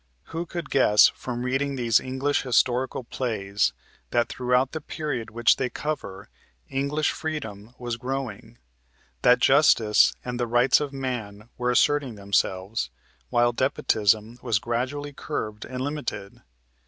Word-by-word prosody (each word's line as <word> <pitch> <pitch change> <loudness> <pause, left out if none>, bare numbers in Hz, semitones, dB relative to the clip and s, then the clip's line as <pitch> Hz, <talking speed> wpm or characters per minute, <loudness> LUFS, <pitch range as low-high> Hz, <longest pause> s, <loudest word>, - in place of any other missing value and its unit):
Who 170 +1 -3
could 170 +1 -6
guess 105 -6 +6
from 120 -1 -5
reading 135 +2 -1
these 120 -4 +3
English 130 +3 -1
historical 125 +1 +1
plays 105 - -1 0.4
that 120 -1 +1
throughout 125 +1 +1
the 160 - -5
period 145 -7 -4
which 120 +1 +3
they 125 - -1
cover 125 -12 -5 0.4
English 140 +3 0
freedom 115 -8 -6
was 120 -2 -4
growing, 125 - -5 0.6
that 125 - +6
justice 135 -7 +5
and 125 0 -4
the 120 - 0
rights 120 +3 +4
of 145 -2 -3
man 120 -6 -5
were 125 0 -1
asserting 135 0 +2
themselves, 100 - -1 0.4
while 120 - +3
despotism 115 -3 +1
was 115 -4 +1
gradually 130 +6 -3
curbed 105 -8 -5
and 130 0 -6
limited? 125 -9 -5
125 Hz, 130 wpm, -25 LUFS, 110-135 Hz, 0.6 s, guess